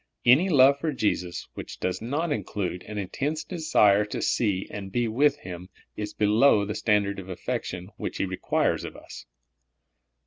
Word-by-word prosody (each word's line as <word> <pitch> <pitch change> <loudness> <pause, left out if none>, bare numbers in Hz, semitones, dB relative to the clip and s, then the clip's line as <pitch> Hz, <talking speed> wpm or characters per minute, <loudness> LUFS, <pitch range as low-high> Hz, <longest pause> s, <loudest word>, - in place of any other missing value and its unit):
Any 145 +11 +6
love 140 -3 +6
for 160 +1 -1
Jesus 95 - -2
which - - -8
does 90 0 -2
not 150 +8 -2
include 95 -9 -3
an 105 - -6
intense 140 - -2
desire 130 - +3
to 105 - -5
see 100 -5 0
and 95 -2 -7
be 120 +3 0
with 140 +6 +2
Him 90 -3 -9 0.3
is 105 0 -4
below 105 +1 +4
the 105 - -3
standard 100 -2 +1
of 95 0 -9
affection 90 +1 -4
which - - -4
He - - 0
requires 95 -1 0
of - - -7
us. - - -11
105 Hz, 165 wpm, -26 LUFS, 95-140 Hz, 0.3 s, Any